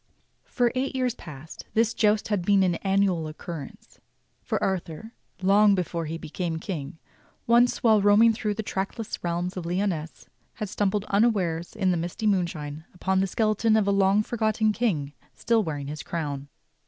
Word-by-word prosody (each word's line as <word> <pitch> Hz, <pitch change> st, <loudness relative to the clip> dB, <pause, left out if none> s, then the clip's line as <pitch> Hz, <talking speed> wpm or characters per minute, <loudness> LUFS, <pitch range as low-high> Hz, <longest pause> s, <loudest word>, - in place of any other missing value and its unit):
For 245 Hz, -2 st, +1 dB
eight 265 Hz, +1 st, -2 dB
years 255 Hz, -2 st, 0 dB
past 155 Hz, -, -11 dB
this 225 Hz, +1 st, +3 dB
joust 210 Hz, 0 st, +2 dB
had 205 Hz, -4 st, 0 dB
been 195 Hz, +1 st, +4 dB
an 180 Hz, -2 st, +2 dB
annual 195 Hz, -4 st, +1 dB
occurrence; 155 Hz, -1 st, -9 dB, 0.4 s
for -, -, -2 dB
Arthur, 190 Hz, +3 st, -3 dB, 0.3 s
long 200 Hz, +1 st, +5 dB
before 170 Hz, -3 st, -2 dB
he 165 Hz, +2 st, -4 dB
became 165 Hz, +1 st, -4 dB
King, 160 Hz, -4 st, -5 dB, 0.5 s
once 240 Hz, +1 st, +3 dB
while 220 Hz, -3 st, +5 dB
roaming 210 Hz, +3 st, +6 dB
through 215 Hz, -2 st, -2 dB
the 220 Hz, -, -3 dB
trackless 200 Hz, +2 st, -4 dB
realms 175 Hz, +2 st, -2 dB
of 170 Hz, -2 st, -4 dB
Lyonesse 175 Hz, -3 st, -2 dB, 0.3 s
had 215 Hz, -3 st, -4 dB
stumbled 205 Hz, 0 st, 0 dB
unawares 195 Hz, -6 st, +1 dB
in 190 Hz, -4 st, +1 dB
the 175 Hz, -, +1 dB
misty 175 Hz, +6 st, -4 dB
moonshine 160 Hz, -7 st, -1 dB
upon 190 Hz, +1 st, 0 dB
the 195 Hz, -, +1 dB
skeleton 215 Hz, +2 st, +2 dB
of 210 Hz, -2 st, +1 dB
a -, -, +3 dB
long 195 Hz, +1 st, +3 dB
forgotten 220 Hz, -1 st, +1 dB
king 165 Hz, -12 st, -1 dB, 0.2 s
still 230 Hz, -1 st, +2 dB
wearing 150 Hz, -7 st, -4 dB
his 150 Hz, +2 st, -6 dB
crown. 145 Hz, -4 st, -4 dB
195 Hz, 165 wpm, -26 LUFS, 170-215 Hz, 0.5 s, roaming